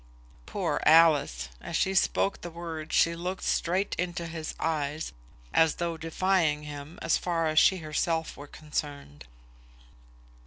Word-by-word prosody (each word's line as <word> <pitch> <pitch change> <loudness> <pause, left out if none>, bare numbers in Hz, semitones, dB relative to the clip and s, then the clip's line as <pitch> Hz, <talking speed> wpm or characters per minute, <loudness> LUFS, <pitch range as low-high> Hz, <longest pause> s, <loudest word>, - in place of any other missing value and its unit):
"Poor 170 -7 -2
Alice!" 150 - +5
As - - -5
she 190 - +1
spoke 195 +1 +1
the 175 - -6
words 165 -2 -5
she 170 0 +4
looked 180 +2 -4
straight 185 +4 0
into 175 -1 -2
his 160 -1 -6
eyes, 155 -1 -2 0.4
as 160 -1 +4
though 170 -1 -2
defying 165 -1 +1
him, 145 +2 -8
as 165 - +3
far 170 -2 -1
as 155 0 +4
she 190 - +5
herself 160 0 -2
were 145 - -10
concerned. 145 - -6
160 Hz, 140 wpm, -28 LUFS, 150-170 Hz, 0.4 s, Alice